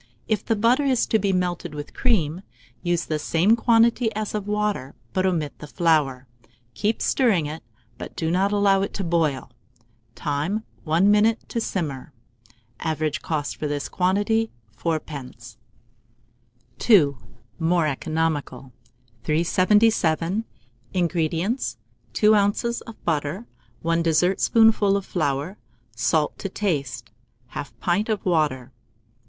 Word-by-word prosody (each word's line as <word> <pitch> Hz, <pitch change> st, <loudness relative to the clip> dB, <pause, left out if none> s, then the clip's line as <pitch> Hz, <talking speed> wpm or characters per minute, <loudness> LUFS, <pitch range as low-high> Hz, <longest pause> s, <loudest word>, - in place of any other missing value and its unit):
If 215 Hz, -3 st, 0 dB
the 225 Hz, -, 0 dB
butter 235 Hz, +7 st, +3 dB
is 260 Hz, -4 st, +2 dB
to 220 Hz, -, +2 dB
be 200 Hz, -1 st, +1 dB
melted 180 Hz, -4 st, -2 dB
with 145 Hz, 0 st, -7 dB
cream, 180 Hz, -, +1 dB, 0.4 s
use 175 Hz, -1 st, 0 dB
the 155 Hz, -1 st, -2 dB
same 175 Hz, +8 st, +3 dB
quantity 230 Hz, 0 st, +3 dB
as 215 Hz, -1 st, -3 dB
of 210 Hz, -1 st, -3 dB
water, 210 Hz, -10 st, -1 dB, 0.2 s
but 185 Hz, 0 st, +1 dB
omit 160 Hz, -6 st, -2 dB
the 150 Hz, -, -9 dB
flour; 150 Hz, -6 st, +1 dB, 0.5 s
keep 215 Hz, +2 st, -1 dB
stirring 215 Hz, -, +2 dB
it, 155 Hz, +2 st, -6 dB, 0.4 s
but -, -, -8 dB
do 160 Hz, -1 st, -1 dB
not 190 Hz, +3 st, +2 dB
allow 200 Hz, -1 st, +3 dB
it 200 Hz, -, -3 dB
to 195 Hz, -, -2 dB
boil. 160 Hz, -8 st, 0 dB, 0.6 s
Time. 155 Hz, +9 st, -2 dB, 0.2 s
1 170 Hz, +6 st, +4 dB
minute 220 Hz, +2 st, +2 dB
to 230 Hz, -, -2 dB
simmer. 145 Hz, -10 st, -4 dB, 0.7 s
Average 155 Hz, -2 st, -2 dB
cost 150 Hz, -3 st, -3 dB
for 150 Hz, -, -3 dB
this 145 Hz, -1 st, -3 dB
quantity, 205 Hz, +5 st, +1 dB, 0.3 s
4d. 150 Hz, -4 st, -5 dB, 1.3 s
II. 160 Hz, -11 st, +6 dB, 0.5 s
(More 165 Hz, 0 st, +2 dB
Economical.) 150 Hz, -2 st, -2 dB, 0.5 s
377. 185 Hz, -, +2 dB, 0.5 s
INGREDIENTS. 175 Hz, -, -1 dB, 0.4 s
2 215 Hz, 0 st, +5 dB
oz. 210 Hz, +4 st, +1 dB
of 225 Hz, -, -12 dB
butter, 160 Hz, +6 st, -1 dB, 0.4 s
1 165 Hz, 0 st, +1 dB
dessertspoonful 195 Hz, +5 st, +3 dB
of 200 Hz, -, -5 dB
flour, 155 Hz, +3 st, -2 dB, 0.4 s
salt 150 Hz, +6 st, 0 dB
to 195 Hz, -, -4 dB
taste, 140 Hz, -, -3 dB, 0.4 s
1/2 140 Hz, -4 st, -6 dB
pint 195 Hz, +5 st, 0 dB
of 215 Hz, -2 st, -1 dB
water. 150 Hz, -8 st, 0 dB
175 Hz, 125 wpm, -24 LUFS, 155-210 Hz, 1.3 s, II